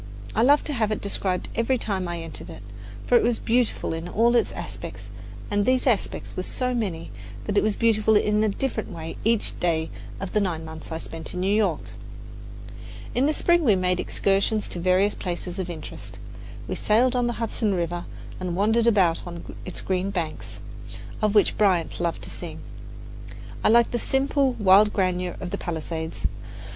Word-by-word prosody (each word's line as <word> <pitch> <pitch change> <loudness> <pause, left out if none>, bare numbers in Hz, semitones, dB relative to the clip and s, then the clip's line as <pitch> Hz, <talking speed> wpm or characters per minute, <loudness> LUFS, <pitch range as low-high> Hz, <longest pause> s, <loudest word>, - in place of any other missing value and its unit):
I 220 - +2
loved 285 +5 +5
to 295 - -2
have 220 -5 0
it 215 - -1
described 190 -2 -1
every 230 +3 +1
time 195 -6 -2
I 170 -1 -3
entered 160 -2 -6
it; 100 - -10 0.4
for 245 - +3
it - - +4
was 235 -1 +2
beautiful 235 -6 0
in 165 +1 -4
all 235 +4 +3
its 235 - +3
aspects, - - -7 0.4
and 205 0 +2
these 255 +3 +2
aspects 235 -7 0
were - - -2
so 250 +6 -1
many 190 -9 -3 0.3
that 205 - -2
it - - +5
was 215 -1 +1
beautiful 220 -1 +3
in 210 +1 +3
a 215 - +3
different 225 +1 -2
way 165 0 -6
each 225 0 +1
day 160 -2 0 0.3
of 195 -1 -5
the 210 - +3
nine 165 -5 -2
months 160 0 -9
I 160 - -2
spent 165 +1 -6
in 180 - -2
New 195 +2 +2
York. 215 -1 +2 1.3
In 265 +3 +2
the - - +3
spring 345 -1 +3
we 220 -8 +5
made 180 -1 +1
excursions 200 +2 +1
to 175 - -4
various 185 +3 +3
places 180 0 -4
of 185 -1 -3
interest. 160 -3 -8 0.5
We - - -2
sailed 240 +4 +2
on 245 -1 +2
the 240 - -1
Hudson 225 -3 -1
River 175 0 -2 0.3
and 180 -2 -3
wandered 220 +4 +3
about 185 -7 +4
on 170 -1 -8
its 185 - -5
green 190 +1 -1
banks, 170 -5 -4 0.6
of 215 0 +2
which 205 - +4
Bryant 185 -6 +2
loved 170 -1 -2
to - - -5
sing. - - -7 1.1
I - - +5
liked 235 +1 +5
the 240 - 0
simple, 270 0 +1
wild 205 -1 +5
grandeur 180 -2 0
of 180 - -5
the - - -3
palisades. 160 - -4
200 Hz, 185 wpm, -25 LUFS, 175-230 Hz, 1.3 s, loved